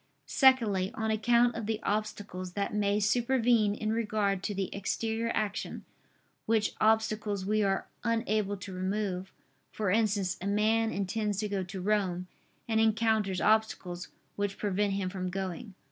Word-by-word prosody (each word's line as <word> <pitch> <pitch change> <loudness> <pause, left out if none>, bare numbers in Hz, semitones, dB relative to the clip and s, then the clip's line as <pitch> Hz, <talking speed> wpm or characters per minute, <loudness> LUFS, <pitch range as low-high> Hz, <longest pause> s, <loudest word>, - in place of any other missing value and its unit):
Secondly, 225 -9 +4
on 220 0 -1
account 235 +2 +3
of 225 -2 -5
the 220 -1 -1
obstacles 205 -4 -3
that 200 +1 -2
may 205 0 +1
supervene 230 -1 +2
in 215 0 -1
regard 210 -4 0
to 205 +1 -3
the 190 -1 -2
exterior 225 +3 -1
action, 210 0 -3 0.6
which 220 -1 +2
obstacles 215 -2 +1
we 215 +2 +2
are 195 -1 +1 0.2
unable 215 -3 0
to 190 0 -8
remove: 190 0 -2 0.4
for 205 -4 -1
instance, 205 -3 +1
a 195 - -3
man 220 +2 +2
intends 205 0 -1
to 210 +1 -1
go 200 -1 -1
to 185 +1 -6
Rome, 185 -3 0 0.4
and 220 -1 +2
encounters 220 -3 +2
obstacles, 210 -5 +1 0.3
which 205 -1 -2
prevent 205 0 0
him 195 -1 -1
from 185 -1 -3
going. 190 +1 -5
210 Hz, 145 wpm, -30 LUFS, 195-220 Hz, 0.6 s, Secondly